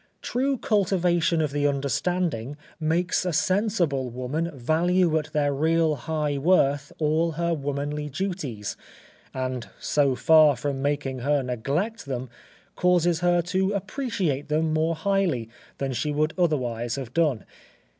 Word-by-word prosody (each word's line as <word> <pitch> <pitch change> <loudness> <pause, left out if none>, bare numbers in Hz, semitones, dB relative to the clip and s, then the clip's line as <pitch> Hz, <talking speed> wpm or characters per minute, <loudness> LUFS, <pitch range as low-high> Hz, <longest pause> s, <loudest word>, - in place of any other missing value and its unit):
True 270 +2 0
cultivation 180 -6 +2
of 150 - -1
the 145 0 +1
understanding 140 -1 -1 0.2
makes 170 +4 +1
a 180 - -1
sensible 175 - +1
woman 130 +7 -3
value 165 +5 +1
at 155 0 -8
their 145 -2 +1
real 160 +2 +2
high 150 0 -2
worth 145 -3 +2
all 160 +2 +1
her 170 +2 0
womanly 145 0 -3
duties, 145 - -4 0.6
and 130 -2 -4
so 140 -3 +2
far 155 0 +6
from 135 +2 -3
making 140 -2 -1
her 140 +2 +1
neglect 140 - -2
them, 130 -2 -4 0.4
causes 175 -2 +2
her 175 0 +2
to 190 +3 0
appreciate 195 - -2
them 155 +1 +1
more 160 +1 +1
highly 170 - 0 0.3
than 135 -1 -2
she 125 +5 -1
would 155 +2 0
otherwise 120 -9 0
have 130 -3 -6
done. 150 -9 +1
155 Hz, 135 wpm, -25 LUFS, 140-175 Hz, 0.6 s, far